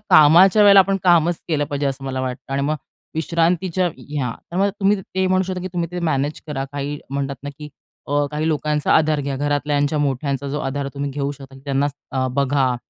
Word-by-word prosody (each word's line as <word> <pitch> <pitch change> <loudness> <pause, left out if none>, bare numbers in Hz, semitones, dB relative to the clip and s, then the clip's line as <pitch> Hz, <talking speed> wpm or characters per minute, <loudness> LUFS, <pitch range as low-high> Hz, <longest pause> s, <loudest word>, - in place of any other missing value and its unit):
कामाच्या 175 +7 +7
वेळेला 200 -1 +8
आपण 195 0 +3
कामच 175 -1 +4
केलं 150 -3 0
पाहिजे 145 0 -3
असं 135 0 -4
मला 130 -1 -3
वाटतं 130 +1 -5
आणि 140 - 0
मग 150 +2 0 0.4
विश्रांतीच्या 170 +3 +1 0.3
हां, 125 -3 -1 0.2
तर - - -6
मग 200 +1 +3
तुम्ही 200 +1 +3
ते 190 0 -2
म्हणू 185 0 +2
शकता 185 -1 -4
की 185 - -3
तुम्ही 170 -1 -1
ते 180 - -3
मॅनेज 145 -1 -1
करा. 140 -3 -3
काही 145 +1 -4
म्हणतात 140 0 -2
ना 145 - -4
की 150 0 -8 0.4
अ, 145 +1 +1
काही 150 +1 -1
लोकांचा 150 -1 0
आधार 155 -1 +3
घ्या 140 0 -3
घरातल्याच्या 145 +1 0
मोठ्यांचा 140 0 -1
जो 145 +2 -3
आधार 140 0 -3
तुम्ही 140 0 -3
घेऊ 140 0 -2
शकता 135 -1 -12
त्यांना 140 0 +1 0.2
अ, 130 -1 0
बघा. 135 -2 +1
145 Hz, 200 wpm, -21 LUFS, 140-170 Hz, 0.4 s, वेळेला